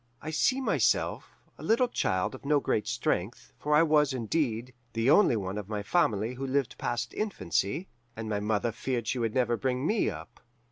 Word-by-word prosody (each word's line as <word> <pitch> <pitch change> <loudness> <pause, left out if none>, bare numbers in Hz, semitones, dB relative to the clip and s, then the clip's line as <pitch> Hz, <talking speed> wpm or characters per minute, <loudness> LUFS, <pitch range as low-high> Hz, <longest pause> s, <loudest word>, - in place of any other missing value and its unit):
"I 155 - -6
see 255 - +2
myself, 265 - +1 0.3
a - - -9
little 235 +3 +3
child 95 - 0
of 130 - -10
no 145 +1 +3
great 110 -5 -1
strength, 95 +8 -2
for 150 0 +1
I 155 - +6
was, 150 -3 +3
indeed, 125 -1 -1 0.2
the 115 +4 +2
only 190 - +5
one 100 -1 -3
of 100 -1 -8
my 105 -1 -3
family 110 - +1
who 135 +2 -5
lived 135 -2 -1
past 120 0 -2
infancy, 105 - -1 0.3
and 110 0 -5
my 105 -1 -1
mother 105 +2 0
feared 120 -1 -3
she 125 +2 -1
should 115 -2 -1
never 120 -2 +2
bring 130 +1 -1
me 215 +5 +2
up. 120 - -9
125 Hz, 190 wpm, -29 LUFS, 110-150 Hz, 0.3 s, I